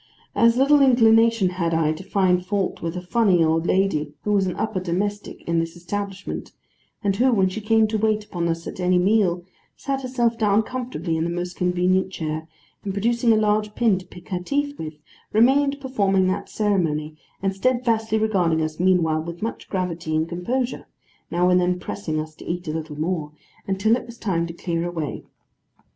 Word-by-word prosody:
As 230 +1 +4
little 280 +2 +5
inclination 230 -5 +5
had 170 -2 -1
I 160 -1 +2
to 155 - -9
find 185 -2 +2
fault 195 0 -2
with 165 +1 -3
a 180 - -5
funny 185 -3 +3
old 165 +1 +1
lady 155 -6 +1
who 210 - -1
was 195 -2 +2
an 180 - -3
upper 215 -3 -2
domestic 200 +4 -3
in 170 0 +2
this 165 0 -3
establishment, 195 +3 -5 0.5
and 200 -1 +1
who, 255 +4 +3
when 195 -5 +3
she 215 +4 -5
came 220 +1 +3
to 215 0 -1
wait 215 0 +1
upon 175 -4 -2
us 165 0 -2
at - - -7
any 180 0 +3
meal, 180 -2 +2 0.3
sat 275 -1 -3
herself 240 -3 0
down 210 0 +3
comfortably 245 -9 -3
in 160 - 0
the 170 - -1
most 175 +1 -4
convenient 180 +1 +1
chair, 160 -2 -4 0.4
and 195 - -3
producing 235 +4 +2
a - - +5
large 210 0 +1
pin 220 -6 +3
to 185 - -14
pick 180 -1 -14
her 180 - -1
teeth 285 +9 -1
with, 155 -1 -6 0.4
remained 275 +5 +4
performing 200 -8 +1
that 190 - -3
ceremony, 160 -8 0 0.3
and 195 0 0
steadfastly 230 -1 +1
regarding 185 -7 +2
us 155 0 -4
meanwhile 170 -4 +3
with 170 +3 -7
much 230 - -5
gravity 175 -4 -2
and 160 +1 +1
composure 240 +10 -2 0.4
(now 175 +1 +2
and 180 0 +4
then 180 0 +1
pressing 170 -4 -3
us 155 0 -5
to - - -13
eat 175 0 -3
a - - -1
little 155 -2 -5
more), 155 -2 -2 0.3
until 200 +4 +2
it 250 - -6
was 235 0 -11
time 170 -7 -1
to 170 - -7
clear 170 -1 -2
away. 170 -4 -4
190 Hz, 190 wpm, -23 LUFS, 170-220 Hz, 0.5 s, little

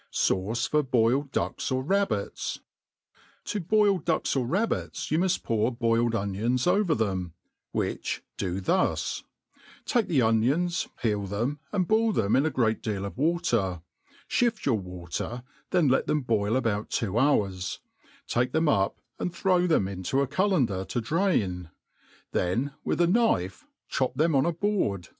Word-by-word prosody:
Sauce 110 +6 0
for 150 0 +1
^mUd 130 +2 +2
Duels - - -1 0.2
^ 130 -1 0
Rabbits. 195 - -1 0.8
TO 210 - -3
boiled 200 -1 +2
ducks - - 0
or 130 -3 0
rab|)tt8, 200 - -1
you 155 - +3
muft 185 0 +1
pour 115 +1 +1
boiled 115 -1 +1
onions 110 +5 0
pver 180 -2 +2
them, 95 -6 -2 0.4
which - - -2
do 95 0 -2
thus: 95 - 0 0.6
take 235 -3 +1
the 155 -6 +2
onions, 135 +11 +1
peel 105 -4 0
them, 120 +9 -2
and 185 -4 0
boil 220 +1 +3
them 105 - +2
in 140 +4 +3
a - - +2
great 120 -6 +1
deal 100 -4 -3
of 100 - -5
irater 120 - 0 0.2
% - - -29
ihift 235 -2 +1
your 115 -6 +2
water, 90 +6 -5 0.3
then 175 -5 +3
let 130 - +2
diem 150 - +1
boil 110 -3 0
about 110 -5 0
two 110 0 0
hours, 100 -10 +1 0.5
take 125 +1 0
them 160 0 +2
up 100 -9 +2 0.2
and 180 - -3
throw 180 -2 +2
them 155 - +2
into 95 +7 -2
I 140 - +3
cullender 145 - +1
to 120 - -2
drain* 110 - 0 0.6
then 120 +11 0
|if - - 0
ith - - 0
a - - +6
kn^fe 170 - +1 0.2
chop 130 -2 -1
them 160 +3 +2
on 135 +3 +3
a - - +2
board. 170 - -1
125 Hz, 160 wpm, -27 LUFS, 105-170 Hz, 0.8 s, a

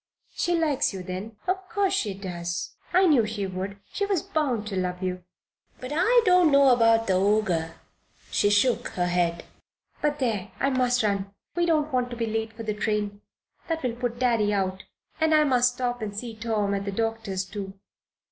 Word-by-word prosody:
"She 350 - 0
likes 305 -9 +1
you, 185 - -6
then?" 185 +5 -6
"Of 375 +1 -1
course 405 -3 +1
she 210 - -1
does." 175 -3 -4 0.2
"I 370 +1 +5
knew 290 -9 +5
she 210 -2 -3
would, 190 +1 -5 0.2
she 405 - -1
was 390 -6 0
bound 260 -9 -1
to 195 - -4
love 180 0 -2
you. 180 -1 -3 0.6
But 255 +2 -7
I 455 +8 +4
don't 360 -4 +5
know 280 -1 +6
about 230 -2 +4
the 190 - +1
Ogre," 200 +1 +2
and 165 0 -2 0.6
she 205 - +3
shook 210 +4 +2
her 180 - +2
head. 175 -1 0 0.6
"But 295 -1 +1
there! 220 -8 -1
I 275 - +2
must 250 -2 +2
run. 200 -1 -1 0.2
We 345 0 +1
don't 310 -3 +1
want 250 -1 +1
to 240 - -6
be 230 -1 -1
late 220 0 -2
for 225 - -8
the 215 -1 -2
train. 210 -1 -2 0.5
That 325 -2 -2
will 250 -2 0
put 240 -1 -3
Daddy 230 -4 +2
out. 190 -1 -1 0.3
And 320 -1 +3
I 305 - +5
must 250 -3 +3
stop 245 -1 -2
and 205 -2 -5
see 230 0 -5
Tom 215 -2 -1
at 200 0 -2
the 200 - -2
doctor's, 220 -3 -2
too." 195 0 -6
225 Hz, 195 wpm, -26 LUFS, 195-270 Hz, 0.6 s, know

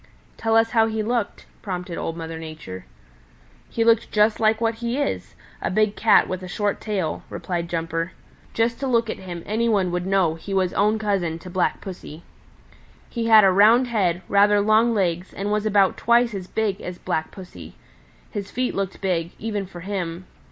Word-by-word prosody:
"Tell 225 0 0
us 225 0 +3
how 225 -1 +4
he 220 -1 -2
looked," 235 -1 -2 0.2
prompted 180 -3 -5
Old 165 0 -4
Mother 165 -1 -6
Nature. 155 -13 -8 0.8
"He 230 - 0
looked 230 -1 +3
just 210 +1 +3
like 220 0 +3
what 230 0 +1
he 235 +2 -1
is 285 -1 -3 0.3
a - - -1
big 215 +1 +1
Cat 215 -2 +4
with 185 0 -4
a 185 - -7
short 205 +3 -2
tail," 190 -8 -2
replied 170 -2 -4
Jumper. 165 0 -2 0.4
"Just 230 +1 +1
to 275 - -2
look 230 -3 +1
at - - -7
him 175 -3 -7
any 230 +3 0
one 195 -5 +1
would 180 +1 -2
know 190 -4 +2
he 195 +5 -6
was 185 -2 +1
own 210 +2 +2
cousin 195 -6 -1
to 180 +2 -11
Black 185 0 0
Pussy. 170 -4 -9 0.9
He 230 -2 -2
had 220 -2 +8
a 190 - +6
round 225 +6 +5
head, 185 -6 0
rather 205 +1 +4
long 220 +3 +3
legs, 180 -2 -1
and 200 +1 -3
was 210 0 0
about 200 -2 +3
twice 235 0 +3
as 190 -2 -5
big 210 -2 -1
as 180 0 -6
Black 160 -2 -2
Pussy. 90 - -11 0.6
His 200 -1 -5
feet 255 0 -2
looked 195 -1 -3
big, 175 -3 -1
even 210 -3 -3
for 175 -2 -10
him. 180 -2 -4
200 Hz, 190 wpm, -23 LUFS, 175-220 Hz, 0.9 s, had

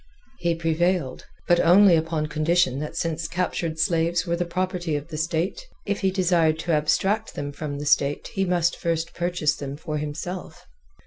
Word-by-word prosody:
He 170 -1 +1
prevailed, 165 -2 0 0.2
but 175 0 +4
only 180 +2 +6
upon 160 -1 0
condition 155 -2 +1
that 150 +1 -5
since 165 -1 -2
captured 170 -1 -2
slaves 170 0 +1
were 170 -1 0
the 175 +1 -1
property 180 -2 -2
of 145 +2 -5
the 160 - -6
state, 165 - -2 0.2
if 200 0 -1
he 195 - +2
desired 175 -4 +2
to 170 - -2
abstract 190 +8 +1
them 145 0 -4
from 145 0 -5
the 145 - -5
state 145 -1 +1
he 195 - 0
must 175 -2 +1
first 165 -1 -2
purchase 175 -3 0
them 140 0 -6
for 155 -1 -4
himself. 165 +5 -6
165 Hz, 175 wpm, -24 LUFS, 155-175 Hz, 0.2 s, only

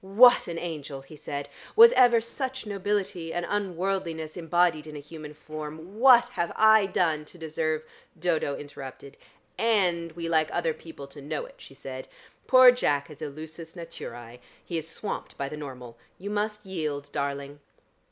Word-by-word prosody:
"What 220 +6 +6
an 170 -1 -4
angel!" 150 -5 -5
he 135 +3 -13
said. 145 -1 -5 0.3
"Was 460 +1 +10
ever 245 - +6
such 260 +2 -4
nobility 200 -4 -2
and 175 0 -2
unworldliness 185 -5 -2
embodied 170 -2 +1
in 155 - -8
a - - -5
human 150 0 -10
form? 155 +6 -8
What 245 -1 +7
have 170 -9 -2
I 220 -2 +6
done 160 -5 +1
to 175 - -15
deserve 155 -1 -2 0.2
" 170 - -29
Dodo 160 -4 0
interrupted. 140 -1 -9 0.4
"And 180 -7 +2
we 165 0 -5
like 160 -2 +2
other 165 -2 0
people 160 -4 -10
to 140 +1 -12
know 150 - -4
it," - - -14
she - - -13
said. - - -7 0.4
"Poor 255 -1 +9
Jack 145 - 0
is 150 - -13
a - - -2
lusus 160 +3 -9
naturæ; 120 -8 -9 0.3
he 170 -2 -2
is 160 - -8
swamped 210 - -5
by 140 - -2
the 150 - -6
normal. 125 -5 -9 0.2
You 200 +3 -6
must 210 0 -2
yield, 150 -6 -4
darling." 140 0 -3
165 Hz, 170 wpm, -27 LUFS, 150-200 Hz, 0.4 s, Was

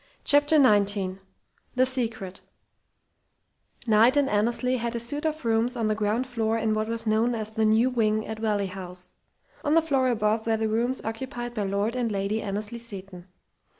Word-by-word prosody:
CHAPTER 290 +2 +4
XIX 200 -8 +3 0.6
THE 255 +1 +4
SECRET 225 -7 -2 1.5
Knight 230 +4 +4
and 285 -1 +3
Annesley 240 +4 +1
had 235 0 -3
a - - -1
suite 290 +7 0
of 310 -3 -4
rooms 230 +2 +1
on 230 -2 -1
the 215 - +1
ground 215 +3 -1
floor 225 -3 -1
in 220 -1 0
what 215 0 -1
was 230 0 0
known 225 +2 +1
as 215 -1 -4
"the 220 0 0
new 225 +4 +3
wing" 215 -3 0
at 220 0 -6
Valley 210 -2 0
House. 180 -1 -9 0.5
On 295 +2 +2
the - - +7
floor 270 -5 +1
above 220 -1 0
were 225 -1 +2
the 220 0 -1
rooms 235 +4 -1
occupied 240 +2 -5
by 210 -4 -2
Lord 200 +4 -1
and 240 -3 -1
Lady 200 +2 -1
Annesley 210 +3 -4
Seton. 195 -5 -6
225 Hz, 180 wpm, -26 LUFS, 210-245 Hz, 1.5 s, the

